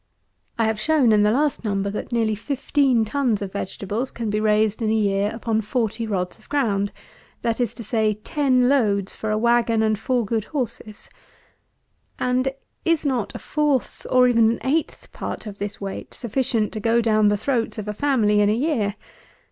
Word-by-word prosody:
I 230 Hz, -, +2 dB
have 220 Hz, -1 st, 0 dB
shown, 280 Hz, -1 st, +3 dB
in 210 Hz, -1 st, +5 dB
the 210 Hz, -, +4 dB
last 285 Hz, +5 st, +1 dB
Number, 200 Hz, -2 st, -1 dB
that 210 Hz, -, -5 dB
nearly 225 Hz, -2 st, +1 dB
fifteen 260 Hz, 0 st, +1 dB
tons 240 Hz, -2 st, 0 dB
of 195 Hz, -, -6 dB
vegetables 205 Hz, +5 st, -3 dB
can 225 Hz, -3 st, -4 dB
be 210 Hz, -, 0 dB
raised 215 Hz, 0 st, +2 dB
in 220 Hz, -, +1 dB
a -, -, +2 dB
year 200 Hz, -1 st, +1 dB
upon 225 Hz, -1 st, -1 dB
forty 225 Hz, 0 st, -2 dB
rods 180 Hz, -4 st, -3 dB
of -, -, -23 dB
ground; 210 Hz, -9 st, 0 dB, 0.5 s
that 230 Hz, 0 st, 0 dB
is 240 Hz, -, -1 dB
to 235 Hz, -, -7 dB
say, 215 Hz, -1 st, +1 dB
ten 255 Hz, +3 st, +1 dB
loads 205 Hz, -8 st, +1 dB
for 220 Hz, -, -4 dB
a 215 Hz, -, +1 dB
wagon 235 Hz, -1 st, +2 dB
and 215 Hz, -1 st, +1 dB
four 245 Hz, 0 st, 0 dB
good 220 Hz, 0 st, -1 dB
horses. 235 Hz, -6 st, -5 dB, 1.1 s
And 255 Hz, +1 st, +1 dB, 0.3 s
is 330 Hz, -2 st, +1 dB
not 250 Hz, -7 st, -1 dB
a -, -, -2 dB
fourth, 295 Hz, -4 st, -1 dB
or 255 Hz, -1 st, +5 dB
even 230 Hz, -2 st, +4 dB
an 230 Hz, -, -1 dB
eighth, 300 Hz, +4 st, -1 dB
part -, -, -6 dB
of 205 Hz, -2 st, -8 dB
this 205 Hz, 0 st, -4 dB
weight, 195 Hz, -1 st, -6 dB
sufficient 235 Hz, -2 st, -1 dB
to 215 Hz, -, -4 dB
go 230 Hz, +2 st, +2 dB
down 215 Hz, -2 st, +3 dB
the 205 Hz, 0 st, +3 dB
throats 230 Hz, +1 st, -1 dB
of 215 Hz, -1 st, -5 dB
a 210 Hz, -, -2 dB
family 215 Hz, -5 st, +2 dB
in 205 Hz, -, +4 dB
a -, -, +3 dB
year? 230 Hz, -6 st, 0 dB
225 Hz, 190 wpm, -23 LUFS, 210-250 Hz, 1.1 s, in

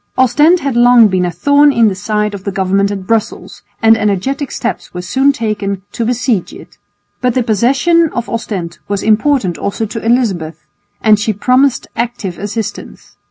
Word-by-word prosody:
Ostend 295 Hz, +7 st, +3 dB
had 275 Hz, -3 st, -2 dB
long 240 Hz, -2 st, +6 dB
been 185 Hz, -1 st, 0 dB
a 175 Hz, -, -2 dB
thorn 285 Hz, -, +3 dB
in 230 Hz, -4 st, +3 dB
the 205 Hz, -, 0 dB
side 210 Hz, +2 st, -2 dB
of 195 Hz, -2 st, -7 dB
the 200 Hz, -, -3 dB
government 195 Hz, +1 st, 0 dB
at 195 Hz, -2 st, -5 dB
Brussels 225 Hz, +1 st, -3 dB, 0.2 s
and 225 Hz, 0 st, +6 dB
energetic 225 Hz, +7 st, -1 dB
steps 235 Hz, -, -5 dB
were 180 Hz, -, -4 dB
soon 270 Hz, +9 st, +2 dB
taken 205 Hz, -6 st, -3 dB
to 235 Hz, -, -3 dB
besiege 245 Hz, -4 st, -1 dB
it. -, -, -14 dB, 0.4 s
But 250 Hz, -2 st, 0 dB
the 255 Hz, -, +1 dB
possession 275 Hz, -, +2 dB
of 240 Hz, -1 st, -4 dB
Ostend 190 Hz, -7 st, -5 dB
was 200 Hz, -1 st, -2 dB
important 220 Hz, -, +1 dB
also 200 Hz, +3 st, -2 dB
to 225 Hz, +1 st, -6 dB
Elizabeth, 215 Hz, -9 st, -1 dB, 0.4 s
and 215 Hz, -2 st, +4 dB
she 215 Hz, +1 st, -1 dB
promised 255 Hz, +5 st, +1 dB
active 230 Hz, -7 st, -4 dB
assistance. 210 Hz, 0 st, -6 dB
225 Hz, 170 wpm, -14 LUFS, 200-250 Hz, 0.4 s, long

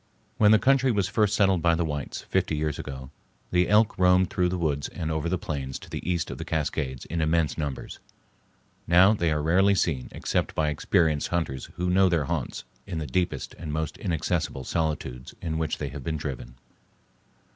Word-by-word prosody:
When 105 Hz, -, +6 dB
the 110 Hz, -, +7 dB
country 135 Hz, +2 st, +3 dB
was 100 Hz, -4 st, +1 dB
first 105 Hz, 0 st, +2 dB
settled 95 Hz, -4 st, +3 dB
by 85 Hz, 0 st, +3 dB
the 85 Hz, 0 st, 0 dB
whites, 75 Hz, -2 st, -4 dB
fifty 80 Hz, -, 0 dB
years 75 Hz, -1 st, -2 dB
ago, 65 Hz, -1 st, -7 dB, 0.4 s
the 90 Hz, 0 st, +2 dB
elk 105 Hz, +1 st, +4 dB
roamed 90 Hz, 0 st, +4 dB
through 90 Hz, -1 st, +1 dB
the 90 Hz, -, -2 dB
woods 75 Hz, -4 st, -1 dB
and 80 Hz, -1 st, -4 dB
over 80 Hz, +1 st, -1 dB
the 90 Hz, -, 0 dB
plains 70 Hz, -5 st, -4 dB
to -, -, -14 dB
the -, -, -4 dB
east 85 Hz, -4 st, -1 dB
of -, -, -7 dB
the -, -, -3 dB
Cascades 70 Hz, -5 st, -2 dB
in 85 Hz, +1 st, -3 dB
immense 80 Hz, 0 st, +1 dB
numbers; 70 Hz, -4 st, -5 dB, 0.9 s
now 95 Hz, +5 st, +6 dB
they 85 Hz, -6 st, 0 dB
are 75 Hz, -1 st, 0 dB
rarely 95 Hz, +5 st, +4 dB
seen 80 Hz, -8 st, 0 dB
except -, -, -2 dB
by 75 Hz, -1 st, +1 dB
experienced 75 Hz, 0 st, +1 dB
hunters 80 Hz, -7 st, -2 dB
who 90 Hz, +1 st, -1 dB
know 95 Hz, +1 st, +5 dB
their 85 Hz, -4 st, +1 dB
haunts 70 Hz, -5 st, -3 dB, 0.2 s
in 90 Hz, -4 st, -4 dB
the 80 Hz, -, -3 dB
deepest 75 Hz, 0 st, -2 dB
and 80 Hz, -2 st, -5 dB
most 80 Hz, 0 st, -2 dB
inaccessible 80 Hz, -4 st, -1 dB
solitudes 75 Hz, -5 st, -3 dB
to 80 Hz, -, -4 dB
which 80 Hz, -1 st, -1 dB
they 75 Hz, -, -4 dB
have 70 Hz, -1 st, -8 dB
been 80 Hz, +3 st, -2 dB
driven. 65 Hz, -5 st, -6 dB
80 Hz, 195 wpm, -26 LUFS, 75-90 Hz, 0.9 s, the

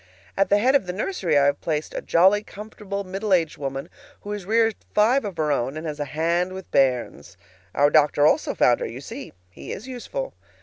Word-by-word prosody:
At 195 Hz, -, +2 dB
the 205 Hz, -, +5 dB
head 250 Hz, +6 st, +3 dB
of 275 Hz, -10 st, +2 dB
the 180 Hz, -, -3 dB
nursery 185 Hz, -, 0 dB
I 140 Hz, -, +4 dB
have 140 Hz, 0 st, +1 dB
placed 155 Hz, -2 st, -2 dB
a -, -, -4 dB
jolly, 190 Hz, +5 st, +4 dB
comfortable 205 Hz, -1 st, -7 dB
middle 195 Hz, +1 st, 0 dB
aged 165 Hz, -3 st, -1 dB
woman 135 Hz, -1 st, -4 dB, 0.3 s
who 205 Hz, -, -7 dB
has 205 Hz, -3 st, -5 dB
reared 225 Hz, +1 st, +3 dB, 0.2 s
five 235 Hz, +6 st, +4 dB
of 200 Hz, -5 st, -6 dB
her 155 Hz, -2 st, 0 dB
own 135 Hz, +1 st, -1 dB
and 155 Hz, -, -6 dB
has 150 Hz, -1 st, -5 dB
a 145 Hz, -, -1 dB
hand 170 Hz, +5 st, -1 dB
with 190 Hz, -1 st, -9 dB
bairns. 130 Hz, -3 st, 0 dB, 0.4 s
Our 145 Hz, +1 st, +4 dB
doctor 150 Hz, -1 st, +4 dB
also -, -, +2 dB
found -, -, +4 dB
her. -, -, -3 dB
You -, -, -8 dB
see, -, -, -8 dB, 0.2 s
he -, -, -9 dB
is 215 Hz, +6 st, -7 dB
useful. 265 Hz, -, -5 dB
180 Hz, 215 wpm, -23 LUFS, 150-210 Hz, 0.4 s, the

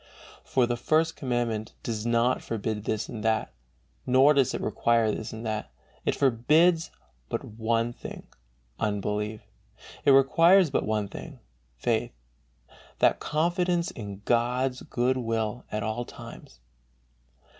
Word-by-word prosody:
For 130 Hz, -2 st, +2 dB
the 120 Hz, 0 st, -2 dB
First 160 Hz, +6 st, +1 dB
Commandment 120 Hz, -4 st, -2 dB
does 115 Hz, -1 st, -3 dB
not 120 Hz, +2 st, +2 dB
forbid 110 Hz, -1 st, -3 dB
this 110 Hz, 0 st, -1 dB
and 110 Hz, -3 st, -7 dB
that, 110 Hz, -1 st, 0 dB, 0.5 s
nor 130 Hz, +4 st, +5 dB
does 135 Hz, -3 st, +2 dB
it -, -, -3 dB
require 115 Hz, -2 st, +2 dB
this 110 Hz, +1 st, -5 dB
and 110 Hz, +1 st, -7 dB
that; 110 Hz, -5 st, -3 dB, 0.4 s
it -, -, +1 dB
forbids 155 Hz, +7 st, +3 dB, 0.4 s
but -, -, -2 dB
one 115 Hz, +2 st, -1 dB
thing, -, -, -9 dB, 0.5 s
unbelief; 105 Hz, +1 st, -2 dB, 0.6 s
it -, -, +3 dB
requires 165 Hz, +6 st, +6 dB
but -, -, 0 dB
one 105 Hz, -1 st, 0 dB
thing, 140 Hz, +7 st, -9 dB, 0.4 s
faith, -, -, -1 dB, 0.8 s
"that -, -, +3 dB
confidence 175 Hz, +2 st, 0 dB
in 100 Hz, -3 st, -8 dB
God's 125 Hz, +2 st, +1 dB
good 125 Hz, +2 st, 0 dB
will 115 Hz, -1 st, -2 dB
at 105 Hz, +1 st, -2 dB
all 110 Hz, +2 st, -2 dB
times." 65 Hz, -, -12 dB
120 Hz, 130 wpm, -27 LUFS, 110-135 Hz, 0.8 s, requires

